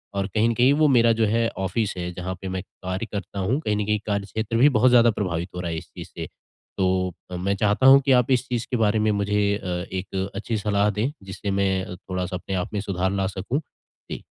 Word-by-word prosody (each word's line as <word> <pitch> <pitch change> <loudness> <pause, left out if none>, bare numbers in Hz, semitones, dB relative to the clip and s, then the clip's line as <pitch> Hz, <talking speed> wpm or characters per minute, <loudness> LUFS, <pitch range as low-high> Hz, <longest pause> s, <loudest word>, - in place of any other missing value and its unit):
और 100 0 0
कहीं 110 +4 +1
न 115 - +1
कहीं 125 +4 +4
वो 155 +1 +4
मेरा 120 -4 +5
जो 110 - +4
है 115 +2 +2 0.2
ऑफिस 100 +3 -1
है 90 0 -3
जहाँ 90 +1 -4
पे 95 - -5
मैं 95 0 -3
कार्य 95 +2 -5
करता 100 -1 -5
हूँ, 115 +10 0
कहीं 105 -8 0
न 105 - -1
कहीं 105 0 +1
कार्यक्षेत्र 105 +3 -2
भी 140 +5 +6
बहुत 130 -1 +4
ज़्यादा 120 -1 +6
प्रभावित 90 -4 -3
हो 90 - -4
रहा 85 -2 -3
है 80 - -3
इस - - -8
चीज़ - - -8
से। - - -5 0.5
तो 95 -1 +1 0.2
अ, - - -4
मैं 100 +2 0
चाहता 105 +5 +1
हूँ 135 +1 +9
कि 135 - +3
आप 125 - -5
इस 130 0 +2
चीज़ 120 -2 -2
के 125 - +1
बारे 110 -1 +2
में 105 0 +2
मुझे 105 0 0 0.2
अ, 95 - -9
1 95 +2 -3
अच्छी 110 +2 -2
सलाह 105 0 +1
दें 105 +6 -1
जिससे 95 +1 -5
मैं 95 -1 0
थोड़ा-सा 90 0 -4
अपने 95 +2 -5
आप 90 +3 -3
में 100 - -1
सुधार 95 -2 -1
ला 95 -1 0
सकूँ। 100 +9 -2 0.5
जी। - - -5
100 Hz, 240 wpm, -24 LUFS, 95-115 Hz, 0.5 s, हूँ